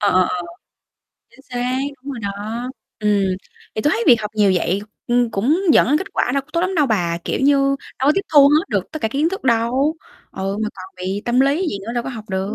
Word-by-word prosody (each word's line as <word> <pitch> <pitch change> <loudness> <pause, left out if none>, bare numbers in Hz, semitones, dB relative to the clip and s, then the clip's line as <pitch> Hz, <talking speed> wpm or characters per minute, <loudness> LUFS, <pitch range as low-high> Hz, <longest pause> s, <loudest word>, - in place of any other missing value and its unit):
Ờ, 205 - +3
ờ, 185 - +4
ờ. 180 -1 -3 0.9
Chính 235 - -19
xác, 250 +1 -1 0.2
đúng 275 +2 -7
rồi 245 - -6
đó, 200 -2 -2 0.7
ừm, 210 -1 +2 0.5
thì 215 - -1
tôi 295 - +3
thấy 465 - 0
việc 240 -6 +6
học 210 -1 -4
nhiều 205 -3 +4
vậy, 180 +2 0 0.3
ừm, 240 -1 +2
cũng 255 - +1
dẫn - - +5
đến 295 +3 +3
kết 380 - -5
quả - - 0
đâu 275 - +2
có 275 - -32
tốt 335 - +1
lắm 370 +2 -1
đâu 300 -5 +3
bà, 175 -7 0
kiểu - - -2
như, 280 +1 +4 0.4
đâu 270 - +2
có - - +6
tiếp - - +2
thu 280 -1 +9
hết 305 +4 +3
được - - 0
tất 310 - -4
cả 220 - +1
kiến 285 +7 +1
thức 385 +2 -5
đâu 250 +5 +2 0.4
ừ, 195 +1 -3
mà 215 - 0
còn 185 0 -11
bị 190 +3 -2
tâm 240 +2 +2
lý 285 +7 +2
gì 200 - -3
nữa 230 - -3
đâu 240 - 0
có - - -6
học 225 -4 -8
được. 190 +2 -2
240 Hz, 255 wpm, -20 LUFS, 205-285 Hz, 0.9 s, thu